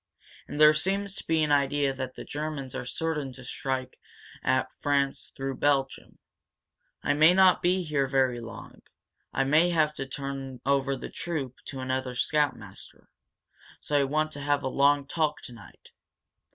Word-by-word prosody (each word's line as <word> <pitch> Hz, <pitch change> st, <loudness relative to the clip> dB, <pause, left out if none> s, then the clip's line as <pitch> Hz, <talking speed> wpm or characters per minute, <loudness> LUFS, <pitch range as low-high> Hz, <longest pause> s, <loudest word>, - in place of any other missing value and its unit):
And 145 Hz, -, -6 dB
there 150 Hz, 0 st, +8 dB
seems 195 Hz, +5 st, -1 dB
to -, -, -9 dB
be 160 Hz, -1 st, +2 dB
an 150 Hz, -, 0 dB
idea 140 Hz, -1 st, +2 dB
that 130 Hz, -1 st, -5 dB
the -, -, -7 dB
Germans 150 Hz, -3 st, -5 dB
are -, -, -5 dB
certain 150 Hz, -3 st, -2 dB
to 130 Hz, -, -12 dB
strike 130 Hz, 0 st, -4 dB, 0.4 s
at 130 Hz, 0 st, +1 dB
France 140 Hz, -1 st, 0 dB
through 135 Hz, -1 st, -3 dB
Belgium. 135 Hz, -2 st, 0 dB, 0.9 s
I 145 Hz, -, +2 dB
may 155 Hz, +4 st, +6 dB
not 190 Hz, -1 st, +6 dB
be 180 Hz, +1 st, +2 dB
here 145 Hz, -4 st, 0 dB
very 130 Hz, -2 st, +1 dB
long 115 Hz, -1 st, -10 dB, 0.5 s
I 135 Hz, -, +1 dB
may 155 Hz, +6 st, +4 dB
have 155 Hz, -3 st, +2 dB
to 135 Hz, -, -5 dB
turn 135 Hz, -1 st, -5 dB
over 140 Hz, 0 st, +2 dB
the 130 Hz, -, -8 dB
troop 145 Hz, -7 st, -4 dB
to 135 Hz, -3 st, -6 dB
another 130 Hz, -1 st, -2 dB
scoutmaster. 130 Hz, -9 st, -2 dB, 0.7 s
So 150 Hz, -, -3 dB
I 145 Hz, -, +5 dB
want 155 Hz, +3 st, 0 dB
to 145 Hz, -, -6 dB
have 145 Hz, 0 st, +1 dB
a -, -, -1 dB
long 140 Hz, +1 st, +3 dB
talk 150 Hz, 0 st, 0 dB
tonight." 120 Hz, -1 st, -13 dB
140 Hz, 165 wpm, -28 LUFS, 130-155 Hz, 0.9 s, there